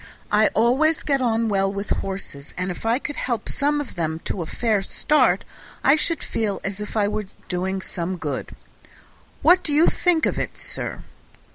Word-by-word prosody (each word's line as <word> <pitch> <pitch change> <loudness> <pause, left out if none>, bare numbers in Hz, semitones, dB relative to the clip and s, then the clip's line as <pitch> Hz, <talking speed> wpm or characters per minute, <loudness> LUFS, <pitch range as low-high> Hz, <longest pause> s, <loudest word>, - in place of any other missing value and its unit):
I 215 +1 +5
always 270 +8 +3
get 275 -3 +1
on 230 -2 +1
well 195 -2 +1
with 200 0 -5
horses, 190 -7 -4
and 180 +1 -1
if 180 - -5
I 230 +2 +3
could 290 +1 -5
help 240 -3 -2
some 295 +1 0
of 290 - -5
them 160 -2 -2
to 190 - -3
a 165 - -4
fair 220 0 +1
start 300 +9 +2 0.4
I 275 - +6
should 320 +1 +2
feel 215 -3 -1
as 195 +1 -4
if 210 +1 -5
I 205 -1 +3
was 210 0 -2 0.2
doing 190 +1 -2
some 180 +1 -4
good. 145 -5 -4 0.9
What 360 +3 +6
do 305 - 0
you 305 +3 +5
think 345 -3 +2
of - - 0
it, - - -4
sir?" - - -3
215 Hz, 185 wpm, -23 LUFS, 190-285 Hz, 0.9 s, I